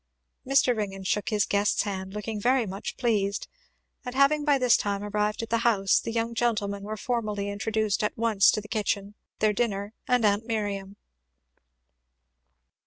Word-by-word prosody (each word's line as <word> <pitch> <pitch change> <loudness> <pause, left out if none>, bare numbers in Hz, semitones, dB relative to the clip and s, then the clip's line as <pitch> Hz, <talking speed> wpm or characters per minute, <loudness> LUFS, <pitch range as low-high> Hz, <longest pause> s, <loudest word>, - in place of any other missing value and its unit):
Mr. 270 -2 +4
Ringgan 195 -3 -4
shook 190 +1 -1
his 210 -2 +2
guest's 205 0 +1
hand, 190 -1 -5
looking 210 0 -4
very 250 +1 +3
much 195 +2 -6
pleased; 205 -5 0 0.6
and 250 -1 -6
having 285 +2 +4
by 290 -2 +3
this 250 -3 +4
time 200 0 -1
arrived 210 +1 -1
at 225 - -7
the 230 - +2
house 205 -5 +3
the - - -5
young 230 0 -1
gentlemen 210 -4 -1
were 215 +2 -5
formally 210 -3 -2
introduced 215 +1 -1
at 210 - -1
once 220 -3 +4
to 215 - +1
the 210 - -12
kitchen, 205 -2 -2 0.2
their 215 -1 +2
dinner, 205 -2 -2
and 250 -3 +3
aunt 205 +2 +1
Miriam. 200 -3 -3
210 Hz, 165 wpm, -27 LUFS, 200-230 Hz, 0.6 s, Mr